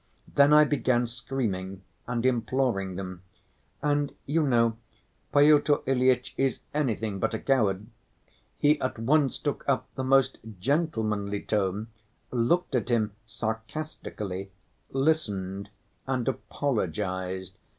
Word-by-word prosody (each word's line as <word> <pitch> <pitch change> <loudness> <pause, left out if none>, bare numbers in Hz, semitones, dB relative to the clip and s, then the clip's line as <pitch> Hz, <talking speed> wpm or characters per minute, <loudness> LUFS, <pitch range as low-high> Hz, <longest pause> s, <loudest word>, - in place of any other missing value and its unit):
Then 140 +1 +4
I 150 0 +8
began 130 -4 +2
screaming 115 -6 -3 0.2
and 120 0 -1
imploring 120 -6 +1
them. 90 -1 -6 0.6
And, 145 -1 +1
you 160 +4 +1
know, 115 -5 +3 0.5
Pyotr 145 0 +5
Ilyitch 130 -1 +2
is 135 -1 +1
anything 110 -8 -1
but - - 0
a - - -3
coward. 105 -7 +1 0.7
He 150 +1 +3
at 130 - -2
once 135 +4 +2
took 145 - -3
up 135 - 0
the 130 - -3
most 135 0 +3 0.2
gentlemanly 110 - 0
tone, 105 +1 -1 0.4
looked 130 +9 +1
at 125 -1 0
him 110 -3 +2 0.2
sarcastically, 110 -4 -5 0.4
listened, 105 -10 0 0.4
and 130 -3 -1
apologized. 95 - -2
120 Hz, 110 wpm, -28 LUFS, 100-140 Hz, 0.7 s, I